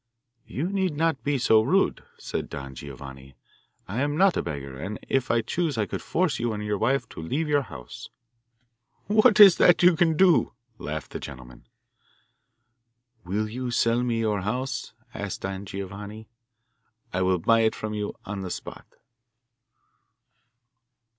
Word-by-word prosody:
'You 150 +7 -3
need 190 -6 -1
not 160 -3 0
be 145 -1 +1
so 110 -3 +4
rude,' 185 - +1
said - - -4
Don 70 -1 -7
Giovanni; 65 0 -10 0.5
'I 110 +7 -2
am 145 +1 0
not 190 0 +4
a - - +1
beggar, 70 -5 -6
and 100 +7 -5
if 135 -1 +1
I 115 - +3
chose 155 +3 -2
I 105 - +1
could - - -5
force 165 -6 0
you 120 -1 -1
and 105 0 -4
your 105 -1 -1
wife 135 +2 +1
to - - -9
leave 145 - -2
your 145 -1 +3
house.' 70 - -10 1.0
'What 215 +2 +4
is 195 -4 +10
that 175 0 +5
you 180 -1 +7
can 160 -1 +2
do?' 180 -9 +4 0.3
laughed 75 +1 -5
the - - -5
gentleman. 65 -3 -11 1.6
'Will 105 +4 -1
you 125 +3 -4
sell 120 0 +2
me 120 -2 0
your 105 -3 0
house?' 125 +7 -3 0.2
asked 100 -2 -5
Don 95 +1 -5
Giovanni. 100 +3 -7 0.9
'I 90 - 0
will 95 0 +2
buy 115 +7 +3
it 110 -1 +2
from 110 0 -5
you 105 -1 -3
on 100 0 -5
the 95 - -5
spot. - - -7
110 Hz, 160 wpm, -26 LUFS, 95-145 Hz, 1.6 s, is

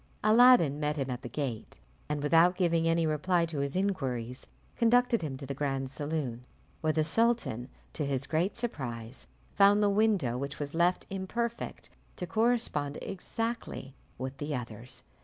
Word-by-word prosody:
Aladdin 215 - +6
met 150 0 0
him 135 -2 -2
at 125 0 -4
the 120 - -7
gate, 125 -4 -4 0.3
and 150 -1 -2
without 165 +4 +5
giving 170 -3 +2
any 165 0 +2
reply 170 +3 +1
to 160 -3 -4
his 140 +2 -2
inquiries 130 - -2 0.3
conducted 240 0 +3
him 145 -5 -4
to 140 - -8
the 140 - -4
grand 135 -1 -2
saloon, 140 -5 -3 0.4
where 155 -1 +2
the 155 0 +1
sultan, 155 - +1 0.2
to 155 - -2
his 140 -1 -1
great 170 +7 0
surprise, 125 - -5 0.3
found 205 +1 +5
the 205 - +4
window, 200 - +2
which 140 +2 -4
was 145 -1 -5
left 175 +2 +2
imperfect, 230 +5 -4 0.2
to 180 - -4
correspond 215 -7 0
exactly 225 - -4 0.2
with 130 +1 -5
the 145 0 -2
others. 120 +1 -7
155 Hz, 160 wpm, -30 LUFS, 135-195 Hz, 0.4 s, Aladdin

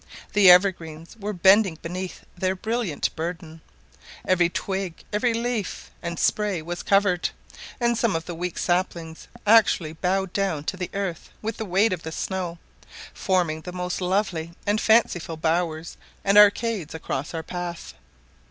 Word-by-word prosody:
The 205 -3 +7
evergreens 170 -3 +3
were 205 +1 -3
bending 190 -1 +4
beneath 180 +2 -6
their 185 +1 0
brilliant 220 -5 -2
burden; 165 -1 -5 0.7
every 175 -2 +3
twig, 190 -2 -4
every 235 +4 +2
leaf, 230 -3 -3
and 170 -1 -4
spray 210 -2 +1
was 175 +2 -5
covered, 195 -3 +2 0.5
and 235 -1 +2
some 230 -4 +1
of 165 0 -3
the 175 - -5
weak 175 +1 -4
saplings 170 -2 -2 0.2
actually 210 -7 +4
bowed 185 +2 -1
down 190 -7 -1
to 185 - -3
the 180 -1 -4
earth 195 -5 -3
with 225 +1 -3
the 220 - -4
weight 195 +3 +2
of 175 - -4
snow, 180 -3 -3 0.6
forming 175 -5 0
the 180 - -7
most 180 0 -3
lovely 180 -3 -1
and 205 +1 +1
fanciful 180 -8 +2
bowers 160 0 -1 0.3
and 200 +1 +2
arcades 210 -4 +4
across 150 -1 -4
our 160 - -3
path. 175 0 -6
180 Hz, 145 wpm, -24 LUFS, 170-205 Hz, 0.7 s, The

